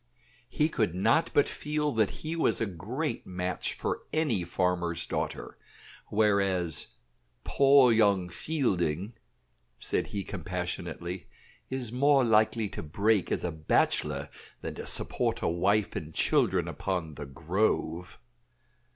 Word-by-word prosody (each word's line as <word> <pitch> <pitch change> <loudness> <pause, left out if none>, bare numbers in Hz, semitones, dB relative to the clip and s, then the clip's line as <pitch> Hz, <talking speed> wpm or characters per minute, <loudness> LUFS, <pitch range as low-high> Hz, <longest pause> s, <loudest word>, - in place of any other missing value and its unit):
He 150 - +2
could 110 - -1
not 150 - +3
but 145 - +4
feel 150 0 -2
that 110 -4 +2
he 160 +1 -5
was 165 - +1
a 115 - +1
great 110 - -4
match 90 0 -2
for - - -3
any 145 - +1
farmer's 85 -1 -1
daughter; - - -4 0.5
whereas 100 -6 +1 0.6
"poor 135 -2 +5
young 100 -5 +3
Fielding," 95 - -1 0.6
said - - -1
he 100 -1 -4
compassionately, 90 -1 -5 0.4
"is 130 -4 -3
more 135 +2 +4
likely 110 -1 +3
to - - -6
break 100 +6 +1
as - - 0
a 90 - -1
bachelor 80 -1 0 0.3
than - - -5
to - - -7
support - - 0
a - - +2
wife 95 +5 +1
and 80 0 -6
children - - +2
upon 90 -5 -3
'The 70 0 -7
Grove.'" 90 +3 -1
100 Hz, 125 wpm, -29 LUFS, 85-120 Hz, 0.6 s, poor